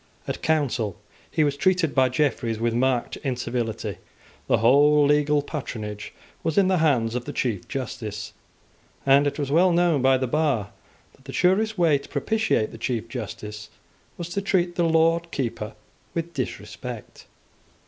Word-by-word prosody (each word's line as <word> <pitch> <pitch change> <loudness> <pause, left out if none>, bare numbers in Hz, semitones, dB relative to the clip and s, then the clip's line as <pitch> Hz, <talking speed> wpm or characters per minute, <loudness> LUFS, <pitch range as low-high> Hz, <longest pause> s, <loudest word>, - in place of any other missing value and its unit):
At - - -4
Council 130 - 0 0.3
he 155 - +1
was 145 -1 +1
treated 170 +1 +2
by 130 -1 +4
Jeffreys 125 -4 0
with 115 0 0
marked 125 0 0
incivility. 120 -4 -3 0.5
The - - +4
whole 145 +6 +5
legal 150 0 +3
patronage 110 -9 -6 0.3
was 160 - -2
in 195 -2 +5
the 185 -2 +2
hands 125 -8 +2
of 125 0 -3
the - - -4
Chief 110 -8 -2
Justice; 115 -6 -5 0.7
and 140 +1 +5
it 145 - -2
was 140 -2 -2
well 175 +4 +5
known 170 -4 +3
by 130 0 +4
the 130 - -1
bar 130 -7 0 0.4
that 135 - -25
the 135 - -7
surest 205 +4 +2
way 160 -5 +4
to - - -14
propitiate 220 - 0
the 115 - -10
Chief 115 -1 -2
Justice 105 -2 -7 0.5
was 175 0 -5
to 200 +3 -2
treat 180 -3 +1
the 175 -1 +1
Lord 165 +1 +3
Keeper 115 -7 -3 0.4
with 170 0 -3
disrespect. 130 -4 -6
140 Hz, 160 wpm, -24 LUFS, 120-165 Hz, 0.7 s, whole